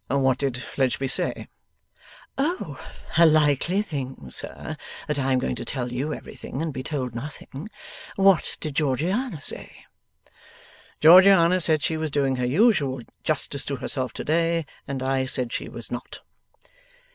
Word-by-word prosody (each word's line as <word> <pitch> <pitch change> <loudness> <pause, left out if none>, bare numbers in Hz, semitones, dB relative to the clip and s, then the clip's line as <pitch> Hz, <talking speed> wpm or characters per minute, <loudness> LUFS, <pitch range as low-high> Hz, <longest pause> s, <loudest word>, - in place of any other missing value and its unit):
What 135 -1 +2
did 135 -3 -1
Fledgeby 135 +1 -1
say?' - - -2 0.9
'Oh, 320 +7 -2 0.4
a 170 - +9
likely 155 +5 +3
thing, 130 - -6
sir, - - -1 0.3
that 150 -1 -1
I 135 0 0
am 130 - +3
going 125 - -1
to - - -5
tell 125 -2 -3
you 135 +5 -2
everything, 135 - -7
and 160 -1 -2
be 130 - -4
told 130 -4 -3
nothing! 140 - -7 0.5
What 195 -3 +3
did 150 -3 -5
Georgiana 165 - 0
say?' - - -5 1.2
'Georgiana 180 +1 +7
said 155 -2 +2
she 160 - 0
was 155 0 -2
doing 135 -2 +1
her 125 - 0
usual 145 - +3 0.2
justice 145 -2 -1
to 140 - -2
herself 130 -1 -3
to - - -5
day, 165 +1 +1 0.2
and 135 -2 -3
I 130 0 +1
said 125 -2 -1
she - - -4
was - - -9
not. - - -6
145 Hz, 150 wpm, -25 LUFS, 130-165 Hz, 1.2 s, a